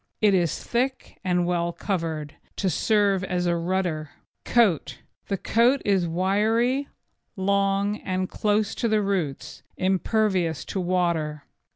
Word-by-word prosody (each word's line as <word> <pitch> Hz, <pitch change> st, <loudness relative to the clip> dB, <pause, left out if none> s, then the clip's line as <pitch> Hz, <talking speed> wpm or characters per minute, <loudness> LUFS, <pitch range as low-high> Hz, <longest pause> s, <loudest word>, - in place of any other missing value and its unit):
It 210 Hz, -2 st, +4 dB
is 175 Hz, -4 st, +1 dB
thick 255 Hz, +2 st, -2 dB
and 180 Hz, -2 st, +1 dB
well 170 Hz, -1 st, 0 dB
covered, 165 Hz, -6 st, -3 dB, 0.2 s
to 190 Hz, -3 st, 0 dB
serve 200 Hz, +1 st, +2 dB
as 180 Hz, -1 st, -1 dB
a 175 Hz, -1 st, +2 dB
rudder. 170 Hz, -3 st, -1 dB, 0.4 s
COAT 170 Hz, -, +2 dB, 0.3 s
The 195 Hz, -, -1 dB
coat 235 Hz, +8 st, +3 dB
is 190 Hz, -4 st, +2 dB
wiry, 215 Hz, +9 st, +1 dB
hard, -, -, -32 dB, 0.4 s
long 200 Hz, +1 st, +1 dB
and 185 Hz, -2 st, -2 dB
close 210 Hz, +4 st, -1 dB
at 230 Hz, -, +3 dB
the 215 Hz, -1 st, +2 dB
roots, 185 Hz, -9 st, -3 dB, 0.2 s
impervious 185 Hz, -, +1 dB
to 195 Hz, -, -3 dB
water. 170 Hz, -5 st, 0 dB
190 Hz, 135 wpm, -25 LUFS, 170-210 Hz, 0.4 s, It